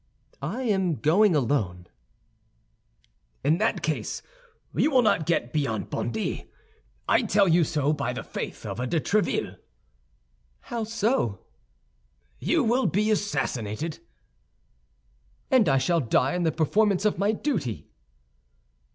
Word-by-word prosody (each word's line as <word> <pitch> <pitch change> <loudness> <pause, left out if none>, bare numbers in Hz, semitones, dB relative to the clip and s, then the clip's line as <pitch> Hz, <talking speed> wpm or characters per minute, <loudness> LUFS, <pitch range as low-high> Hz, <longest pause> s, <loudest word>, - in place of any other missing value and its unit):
"I 195 - -3
am 190 -8 +1
going 175 +6 +3
alone." 110 -11 0 1.6
"In 160 +4 +3
that 220 +2 0
case - - -2 0.5
you - - +2
will 260 -4 +4
not 165 -8 +2
get 125 -8 0
beyond 135 -8 -1
Bondy. 110 -2 -3 0.6
I - - +4
tell 200 0 +3
you 170 0 +4
so, 150 -1 0
by 140 -2 -2
the - - -5
faith - - -6
of - - -5
de 165 - +1
Tréville." 210 +7 0 1.0
"How 230 -2 -4
so?" 215 - -1 0.9
"You - - +1
will 245 +3 +2
be 215 +3 +1
assassinated." 145 - -2 1.5
"And 250 - +5
I 135 - +4
shall 170 +5 +2
die 130 0 +1
in 180 - -1
the 160 - +3
performance 200 +5 +1
of 210 -5 +1
my 200 +2 +3
duty." 135 - -3
170 Hz, 125 wpm, -26 LUFS, 135-215 Hz, 1.6 s, And